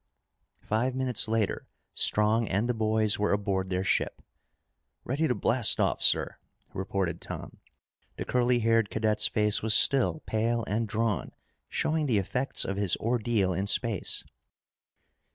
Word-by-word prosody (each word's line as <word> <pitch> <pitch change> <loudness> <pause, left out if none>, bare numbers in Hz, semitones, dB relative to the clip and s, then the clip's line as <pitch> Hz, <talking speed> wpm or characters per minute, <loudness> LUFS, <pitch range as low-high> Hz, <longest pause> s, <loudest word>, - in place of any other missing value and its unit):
Five 120 +4 -1
minutes 130 -4 -1
later, 110 -2 -1 0.3
Strong 110 +2 +2
and 100 +5 0
the 125 - 0
boys 110 -2 +1
were 105 - +1
aboard 100 -2 -1
their 95 0 -1
ship. 95 - -1 0.8
"Ready 145 +6 -1
to 125 - 0
blast 115 +2 +2
off, - - 0
sir," - - +2 0.4
reported 95 -1 -3
Tom. - - -7 0.6
The - - -5
curly 125 0 +1
haired 115 -2 +2
cadet's 110 -1 +1
face 105 -1 +1
was 110 -1 +3
still 140 +3 +4
pale 115 +2 -1
and 110 +3 -2
drawn, 110 -2 -2 0.4
showing 155 -1 -1
the 115 -5 +2
effects 125 +7 0
of 95 - -3
his 100 -3 +1
ordeal 115 -5 0
in 95 +3 -2
space. 110 -2 0
110 Hz, 140 wpm, -28 LUFS, 100-120 Hz, 0.8 s, still